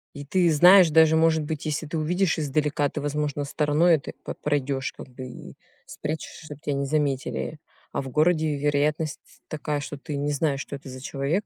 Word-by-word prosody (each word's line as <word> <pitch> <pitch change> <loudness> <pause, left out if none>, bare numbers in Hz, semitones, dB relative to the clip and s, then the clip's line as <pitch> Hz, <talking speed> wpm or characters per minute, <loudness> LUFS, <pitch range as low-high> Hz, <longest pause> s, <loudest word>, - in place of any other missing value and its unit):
И 145 0 -7
ты 175 +3 +2
знаешь, 180 +3 +7
даже 160 0 +5
может 160 -1 +3
быть, 155 +1 -4
если 155 +1 -2
ты 155 +2 -4
увидишь 175 +2 +1
издалека, 150 0 0
ты 150 - -5
возможно 145 0 -2
стороной 150 +4 +3
это 145 - -5
п - - -5
пройдешь 140 -2 -1
как - - -10
бы 130 +1 -9
и 125 - -10 0.3
спрячешься 155 +1 -6
чтоб 150 -1 -10
тебя 145 - -2
не 140 0 -1
заметили. 145 +1 -1 0.3
А - - -2
в 135 - -7
городе 155 +1 +2
вероятность 150 +2 0
т - - -27 0.2
такая, 150 -1 -3
что 145 0 -6
ты 150 +1 -6
не 145 +1 -1
знаешь 145 -1 0
что 140 - -6
это 140 -1 -10
за 130 0 -9
человек. 145 +9 -2
150 Hz, 200 wpm, -25 LUFS, 140-160 Hz, 0.3 s, знаешь